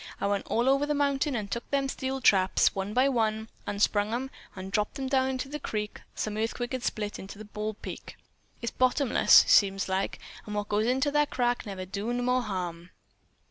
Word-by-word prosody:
"I - - -1
went 200 0 -1
all 235 +3 +1
over 275 +2 +3
the 295 - 0
mountain 280 0 +1
an' 220 - -1
I - - -8
took 235 +4 -5
them 275 -1 +1
steel 265 0 -3
traps, 190 -5 +4
one 195 +1 -3
by 255 +5 +3
one, 220 -4 0 0.2
unsprung 205 +1 +1
'em 265 +2 -4 0.2
and 190 0 -7
dropped 210 +7 -1
'em 270 - -3
down 260 -1 +2
into 260 +1 -3
that 300 0 -5
crack 210 -4 -4
some 215 -1 -3
earthquake 230 +2 -2
had 260 -1 -2
split 210 -1 -3
into 200 +2 -9
Bald 210 0 -5
Peak. - - -8 0.5
It's 235 - -1
bottomless, 255 0 +5
seems 195 -1 +4
like, 190 +1 -1 0.3
an' 210 - -4
what 205 0 -2
goes 210 +2 +1
into 265 +3 +1
that 295 0 +2
crack 245 -2 0
never 190 -2 -5
does 205 +6 -3
no 245 - -1
more 250 +1 +2
harm. 180 -5 -4
225 Hz, 205 wpm, -28 LUFS, 205-260 Hz, 0.5 s, bottomless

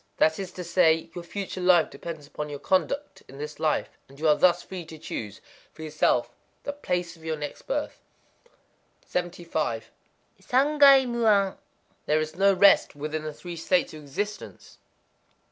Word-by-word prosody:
That 160 +2 +3
is 190 -2 -5
to 180 - -6
say, 165 -2 +2
Your 175 - -7
future 190 +1 -5
life 180 -3 +4
depends 160 -4 -8
upon 150 +1 -6
your 145 - -5
conduct 275 - -1
in 135 - -13
this 150 +1 -7
life; 155 -1 -1
and 140 +1 -16
you 160 - +1
are 150 - +7
thus 175 +1 +3
free 185 -2 -7
to 160 0 -11
choose 110 -7 -6 0.3
for 160 - -10
yourself 150 -6 +1 0.3
the 285 - -4
place 180 -12 -3
of 165 - -19
your 160 -1 -2
next 150 -1 -7
birth. - - -3 1.1
75.—Sangai 245 - +1
mu 235 -1 0
an. 200 -2 +3 0.5
There 155 +1 +3
is 155 0 -3
no 195 +2 +4
rest 195 -5 +5
within 150 +2 -4
the 155 0 -5
Three 175 +3 -8
States 175 +1 +1
of 155 - -9
Existence. 205 +9 -6
170 Hz, 160 wpm, -26 LUFS, 155-195 Hz, 1.1 s, are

